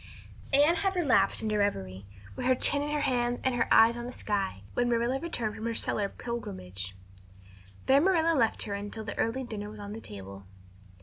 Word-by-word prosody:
_" 275 - +6
Anne 320 +4 +5
had 385 +3 0
relapsed 250 - +3
into 215 -1 0
reverie, 95 - -2 0.3
with 255 - -2
her 255 - +5
chin 285 +3 +2
in 295 - -2
her 295 0 0
hands 245 -3 +1
and 260 - +2
her 240 -1 +1
eyes 230 +1 +7
on 240 0 -5
the - - -5
sky, 195 - -2
when 245 0 +1
Marilla 240 +3 +1
returned 245 -10 -2
from 220 - -5
her 230 - -2
cellar 205 -2 -1
pilgrimage. 95 - -6 0.9
There 270 +2 +5
Marilla 330 -2 +3
left 230 -5 +2
her 205 - -4
until 205 +2 -5
the 215 - -5
early 250 +4 0
dinner 210 -4 -6
was 215 0 -10
on 205 0 -6
the 225 - -7
table. 100 - -10
230 Hz, 200 wpm, -29 LUFS, 200-260 Hz, 0.9 s, eyes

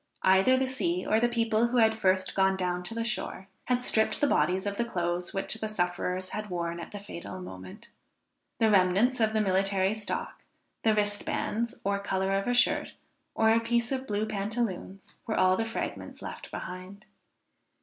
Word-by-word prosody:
Either 190 +8 +5
the 265 - +2
sea 340 +8 -1
or 220 - +3
the 240 +1 +3
people 230 -1 +2
who 245 +1 -1
had 220 -1 +5
first 190 -3 +1
gone 190 0 +3
down 180 -1 -1
to 180 +6 -6
the 230 - -1
shore, 215 -3 -3 0.2
had 250 0 +1
stripped 220 -2 +2
the - - +3
bodies 185 - +2
of 200 0 -2
the 235 - +2
clothes 175 -5 -2
which 195 - -1
the 220 0 -3
sufferers 180 -2 -2
had 215 0 -4
wore 170 -2 -2
at 170 0 -7
the 205 - -7
fatal 185 -2 -8
moment. 95 - -10 0.7
The 225 -1 +3
remnants 200 +7 +3
of 220 -1 +2
the 215 - +2
military 195 0 +2
stock; 215 -1 -4 0.4
the 220 -1 +3
wristbands, 210 +2 -1
or 200 0 0
color 195 -1 -1
of 195 +2 0
a 245 - +2
shirt, 245 - +2 0.4
or 220 0 +4
a 225 - +5
piece 235 +1 0
of 265 0 -2
blue 210 +1 0
pantaloons, 200 -2 -3
were 220 - -1
all 185 0 +5
the 225 - -1
fragments 225 - -5
left - - -7
behind. 185 +3 -8
205 Hz, 185 wpm, -29 LUFS, 185-225 Hz, 0.7 s, Either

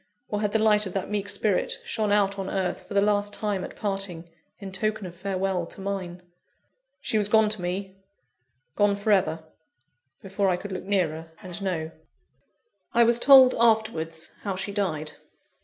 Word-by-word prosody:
or 210 0 -2
had 210 -1 0
the 220 - +2
light 210 -1 +3
of 185 - -8
that 195 +1 -3
meek 205 -1 -2
spirit 200 -1 0
shone 215 -2 -1
out 200 -1 +2
on 190 - -3
earth, 190 -2 -2
for 200 - -7
the 200 - +5
last 205 0 +1
time 205 -3 -2
at - - -8
parting, 195 -5 -3 0.3
in 195 -2 -8
token 215 +1 -2
of 175 - -7
farewell 185 -1 -2
to - - -11
mine? 190 -3 -5 0.8
She 220 - 0
was 205 - +3
gone 220 0 +4
to 210 -3 -1
me, 190 +2 -4 0.8
gone 205 -1 +3
for 205 +2 -1
ever 165 -5 +2 0.8
before 195 0 0
I 180 - +1
could 205 +2 -8
look 185 -1 -5
nearer, 165 -5 -1
and 180 +1 -7
know. 165 -5 -2 1.0
I 235 - +6
was 235 0 +3
told, 260 -1 +8
afterwards, 215 -8 +1
how 195 -2 -3
she 190 +2 -4
died. 165 -7 -2
200 Hz, 175 wpm, -26 LUFS, 185-210 Hz, 1.0 s, told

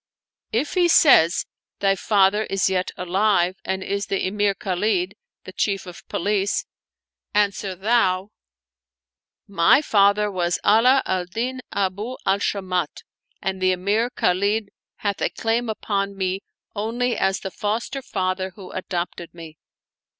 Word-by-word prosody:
If 255 +7 -1
he 360 -2 +3
says: 175 - +5 0.3
Thy 195 -1 +2
father 205 +1 +2
is 195 0 0
yet 185 -1 0
alive 185 0 +1
and 190 0 -2
is 200 +1 -2
the 195 - -1
Emir 205 +1 +1
Khalid, 190 0 -1 0.3
the 185 - -10
Chief 195 -1 -1
of 180 -2 -9
the - - -17
Police; 200 +1 0 0.7
answer 200 -2 +1
thou: 195 -1 +1 1.2
My 195 - +4
father 205 -2 +3
was 175 -2 0
Ala 250 +6 +5
al 185 -1 -1
Din 245 +8 -3
Abu 200 +5 -2
al 195 +1 +2
Shamat, 185 -6 -2 0.4
and 190 0 -2
the 185 0 +3
Emir 205 +6 0
Khalid 200 0 0 0.3
hath 200 -2 -3
a - - +2
claim 230 +1 -1
Upon 200 -2 -2
me 190 0 -1 0.3
only 235 +4 -1
as 190 0 0
the 190 - -5
foster 230 +7 -3
father 185 -4 -2
who 190 -3 -10
adopted 175 -2 -5
me. 160 -2 -11
195 Hz, 135 wpm, -23 LUFS, 185-215 Hz, 1.2 s, says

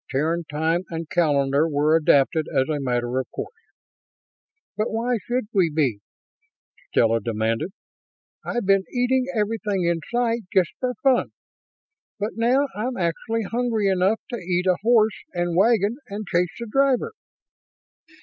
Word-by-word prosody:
Terran 160 +5 -1
time 160 +3 0
and 165 -1 -5
calendar 145 -2 +2
were 150 +1 +2
adapted 155 0 +3
as 130 - +1
a 155 -2 -1
matter 125 -1 -1
of 130 - -5
course. 435 - -6 1.2
"But 215 +1 -1
why 230 +2 -1
should 245 -1 -1
we 185 -5 +3
be?" 140 -9 0 0.9
Stella 115 0 +3
demanded. 115 - -1 0.7
"I've 240 -4 -2
been 195 0 +3
eating 255 +1 +1
everything 210 -3 -1
in 170 -1 +1
sight, 235 -1 +1
just 185 -3 +2
for 250 -1 -2
fun. 265 -3 +2 0.8
But 210 +1 -2
now 250 +5 +2
I'm 245 +5 -3
actually 205 +6 -1
hungry 225 -2 0
enough 190 +3 +2
to 240 - -2
eat 180 -2 -1
a 185 -1 +3
horse 220 -1 +3
and 175 -1 -1
wagon 215 +3 +3
and 205 +2 -6
chase 180 -1 +1
the 235 - -4
driver!" 275 - +1
190 Hz, 140 wpm, -23 LUFS, 160-230 Hz, 1.2 s, adapted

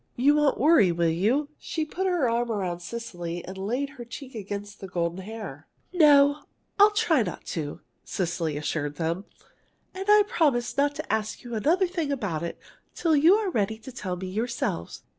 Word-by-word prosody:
You 275 +4 +4
won't 295 -2 +2
worry, 295 - +5
will 170 0 +1
you?" 235 - +1
She 315 -2 -3
put 375 +5 -2
her 350 -8 +2
arm 235 0 0
around 185 -5 -2
Cecily 175 -4 -6
and 190 - -7
laid 235 +9 -2
her 260 -4 -9
cheek 255 +3 -9
against 205 -1 -6
the 195 - -7
golden 170 0 -2
hair. 190 -8 -8 0.3
"No, 290 -3 +6 0.4
I'll 410 +1 +9
try 420 - +2
not 180 -6 -4
to," 155 -1 -4 0.2
Cecily 170 -4 -2
assured 145 -1 -2
them, 165 +5 -2 0.7
"and 385 +2 -5
I'll 420 0 +7
promise 310 - +1
not 285 +1 +2
to 310 +1 -3
ask 215 -1 -2
you 240 -1 -8
another 320 - +2
thing 340 -5 -2
about 200 - -2
it 170 - -4 0.4
till 325 -3 +2
you're 370 +7 +4
ready 220 - 0
to 230 +4 -10
tell 190 -8 -4
me 185 +1 -6
yourselves." 210 - -3
230 Hz, 180 wpm, -26 LUFS, 180-295 Hz, 0.7 s, I'll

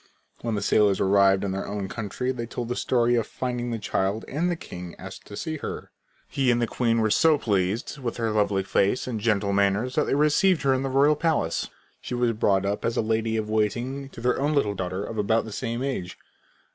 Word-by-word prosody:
When 115 -2 -2
the 100 - -2
sailors 105 -2 +3
arrived 95 0 +4
in 100 - -1
their 95 +1 -3
own 100 -1 -3
country 115 +5 -3
they 120 -2 -5
told 120 0 -5
the 125 - -1
story 120 -1 +2
of 115 -3 +1
finding 125 -1 -3
the 115 - -2
child 100 0 -1
and 165 +6 -1
the 175 - 0
king 90 - -9
asked - - -10
to 100 - -8
see 160 -1 -3
her. - - -6 0.4
He 135 -2 0
and 120 0 +3
the 120 - +2
queen 115 -1 +1
were 110 -1 +1
so 160 +5 +4
pleased 100 +4 -1
with 120 -3 -4
her 115 -2 0
lovely 100 -2 +1
face 100 +4 +1
and 120 -4 -3
gentle 105 -2 +1
manners 100 +5 +1
that 150 +1 +2
they - - 0
received 150 +4 +3
her 135 -1 +4
into 135 +1 -1
the 130 - -5
royal 145 +2 +5
palace. 150 - 0 0.3
She - - -4
was 120 -1 +2
brought 100 -3 +1
up 100 +1 -2
as 115 0 -1
a - - +3
lady 110 0 0
of 110 -1 -2
waiting 120 +6 -1
to 115 - -11
their 125 +2 +1
own 150 +2 +1
little 105 -8 +2
daughter 95 0 -3
of 110 +1 -5
about 110 +2 +2
the 110 - -8
same 115 +3 -3
age. 125 -10 -3
115 Hz, 230 wpm, -25 LUFS, 100-130 Hz, 0.4 s, royal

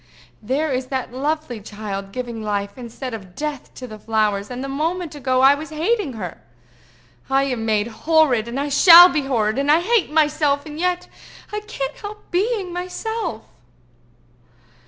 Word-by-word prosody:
There 280 +7 -1
is 255 0 -2
that 260 -2 -4
lovely 285 -3 -2
child 200 -2 -6
giving 240 -1 -5
life 200 -1 -3
instead 250 +1 -7
of 190 -5 -9
death 295 -2 -5
to 255 - -8
the 215 -3 -10
flowers, 210 -2 0
and 250 +2 -5
a - - -4
moment 320 +4 -2
ago 260 -3 0
I 270 +1 +7
was 295 +2 -6
hating 330 - -1
her! 185 -7 -7 0.9
I 270 0 +3
am 245 -5 -2
made 210 -1 +2
horrid, 245 0 +2
and 240 +3 -4
I 285 - -1
shall 345 +4 +9
be 305 - 0
horrid, 225 -3 0
and 280 +1 +2
I 315 - +5
hate 445 -2 +1
myself, 300 -2 +2
and 305 0 -8
yet 360 0 -1 0.5
I 420 - -1
can't 295 -10 -5
help 420 0 -10
being 390 -1 0
myself!" 360 - -4
275 Hz, 165 wpm, -21 LUFS, 225-320 Hz, 0.9 s, shall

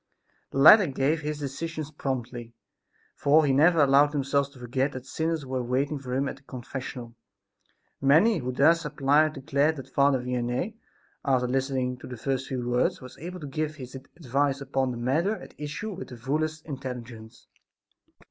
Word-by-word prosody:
The - - -6
latter 180 +8 +9
gave 140 +3 0
his 150 0 -3
decisions 150 +2 -5
promptly, 120 -5 -5 0.6
for 150 +2 +4
he 135 - +2
never 160 +3 +5
allowed 140 +2 +5
himself 140 0 0
to 140 - -17
forget 130 +3 -1
that 130 0 -7
sinners 160 +1 -2
were 130 -1 -2
waiting 135 +4 -1
for 130 -2 -5
him 140 +1 0
at 135 - -6
his 140 - -31
confessional. 125 -1 -7 0.9
Many 160 +11 +5
who 125 0 -3
thus 165 +6 +4
applied 150 +1 +2
declared 145 +2 +1
that 135 -2 -10
Father 140 -1 +3
Vianney, 125 - -2 0.5
after 130 -2 +2
listening 130 -1 -1
to - - -10
the 125 - -7
first 135 +3 -2
few 125 -2 -3
words, 125 0 +1
was 130 -1 -11
able 180 +3 -7
to - - -6
give 155 +2 -3
his 130 -4 -9
advice 140 0 -2
upon 135 -1 -1
the 120 - -4
matter 155 - +1
at - - -12
issue 150 +9 -5
with 190 - -7
the 125 - -10
fullest 155 +5 -2
intelligence. 125 -5 -8
135 Hz, 170 wpm, -27 LUFS, 130-150 Hz, 0.9 s, latter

